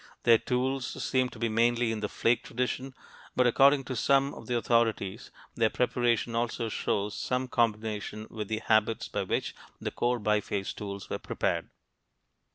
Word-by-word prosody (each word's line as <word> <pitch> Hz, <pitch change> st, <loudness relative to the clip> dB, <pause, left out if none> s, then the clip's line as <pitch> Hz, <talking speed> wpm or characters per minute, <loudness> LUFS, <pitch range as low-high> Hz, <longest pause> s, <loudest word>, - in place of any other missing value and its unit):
Their 115 Hz, -2 st, +6 dB
tools 130 Hz, +1 st, -1 dB
seem 130 Hz, -1 st, +1 dB
to -, -, -12 dB
be 115 Hz, +1 st, 0 dB
mainly 115 Hz, +1 st, +2 dB
in 110 Hz, -, -2 dB
the 105 Hz, -1 st, -2 dB
flake 115 Hz, 0 st, +2 dB
tradition, 125 Hz, +2 st, -3 dB, 0.4 s
but 125 Hz, -, +4 dB
according 135 Hz, +3 st, +5 dB
to 130 Hz, 0 st, -5 dB
some 140 Hz, +4 st, +3 dB
of -, -, -11 dB
the 120 Hz, -1 st, +1 dB
authorities 115 Hz, -3 st, 0 dB, 0.2 s
their 115 Hz, -1 st, +2 dB
preparation 120 Hz, -2 st, +1 dB
also 115 Hz, 0 st, -1 dB
shows 105 Hz, -1 st, -1 dB
some 125 Hz, +1 st, -1 dB
combination 110 Hz, -2 st, -1 dB
with 105 Hz, -2 st, -5 dB
the 110 Hz, +1 st, -3 dB
habits 110 Hz, 0 st, +2 dB
by -, -, -2 dB
which -, -, -2 dB, 0.3 s
the -, -, -3 dB
core 120 Hz, 0 st, 0 dB
biface 105 Hz, -2 st, 0 dB
tools 100 Hz, -2 st, -6 dB
were -, -, -3 dB
prepared. -, -, -2 dB
115 Hz, 165 wpm, -29 LUFS, 110-125 Hz, 0.4 s, Their